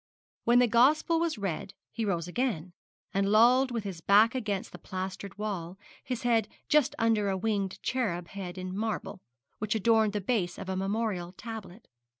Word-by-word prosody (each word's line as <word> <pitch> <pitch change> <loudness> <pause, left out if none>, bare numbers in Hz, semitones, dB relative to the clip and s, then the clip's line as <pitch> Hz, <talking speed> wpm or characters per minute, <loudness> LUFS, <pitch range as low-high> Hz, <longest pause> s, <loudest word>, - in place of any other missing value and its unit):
When 240 +1 +5
the 250 - +6
gospel 285 +8 +4
was 330 -5 0
read 195 -1 -4 0.2
he 225 -1 -2
rose 175 -4 -1
again, 180 -5 -2 0.4
and 195 0 +1
lolled 245 +5 +5
with 235 -3 -3
his 190 -5 -6
back 210 +5 +5
against 210 -7 -2
the - - -10
plastered 190 +1 -6
wall, 190 -4 -4 0.3
his 255 -1 -4
head 230 -3 +2 0.2
just 300 -4 +3
under 220 -3 +2
a 190 - 0
winged 200 -2 -1
cherub 180 -10 -1
head 190 -2 -7
in 185 0 -5
marble, 215 -3 -3 0.4
which 215 +1 -1
adorned 220 -1 +3
the 210 - 0
base 190 -4 -1
of 190 - -7
a 190 - -1
memorial 195 -2 -2
tablet. 220 -1 -9
210 Hz, 170 wpm, -29 LUFS, 190-230 Hz, 0.4 s, the